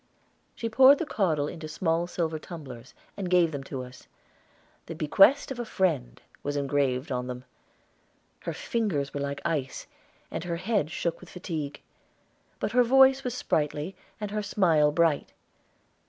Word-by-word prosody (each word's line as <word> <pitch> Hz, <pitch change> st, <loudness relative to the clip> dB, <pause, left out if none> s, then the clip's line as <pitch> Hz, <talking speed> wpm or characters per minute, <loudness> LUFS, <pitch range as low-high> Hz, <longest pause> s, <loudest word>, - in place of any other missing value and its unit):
She 230 Hz, -, -3 dB
poured 265 Hz, +5 st, +7 dB
the 340 Hz, -, -2 dB
caudle 160 Hz, -, 0 dB
into 155 Hz, +1 st, -7 dB
small 165 Hz, +2 st, 0 dB
silver 165 Hz, -3 st, -2 dB
tumblers, 135 Hz, -8 st, -10 dB, 0.2 s
and 190 Hz, -3 st, -4 dB
gave 175 Hz, -2 st, +4 dB
them 140 Hz, -2 st, -5 dB
to 130 Hz, -2 st, -5 dB
us. 125 Hz, 0 st, -13 dB, 0.8 s
"The 165 Hz, -, -6 dB
Bequest 195 Hz, -, +4 dB
of 255 Hz, -, -5 dB
a -, -, -1 dB
Friend" 65 Hz, -, 0 dB, 0.2 s
was 145 Hz, 0 st, -3 dB
engraved 140 Hz, -1 st, 0 dB
on 125 Hz, -1 st, -2 dB
them. 125 Hz, 0 st, -6 dB, 1.0 s
Her -, -, -4 dB
fingers 185 Hz, -12 st, -2 dB
were 145 Hz, -, -3 dB
like 140 Hz, 0 st, -3 dB
ice, 150 Hz, -6 st, -2 dB, 0.5 s
and -, -, -4 dB
her 175 Hz, -1 st, -2 dB
head 185 Hz, -2 st, 0 dB
shook 170 Hz, 0 st, -2 dB
with 180 Hz, -, -14 dB
fatigue; 160 Hz, -6 st, -5 dB, 0.8 s
but -, -, -2 dB
her 250 Hz, 0 st, +5 dB
voice 265 Hz, +2 st, +5 dB
was 250 Hz, -1 st, -3 dB
sprightly 150 Hz, -, -1 dB, 0.2 s
and 210 Hz, -1 st, -4 dB
her 210 Hz, 0 st, -1 dB
smile 165 Hz, -7 st, +3 dB
bright. 165 Hz, -1 st, +1 dB
165 Hz, 155 wpm, -27 LUFS, 145-200 Hz, 1.0 s, poured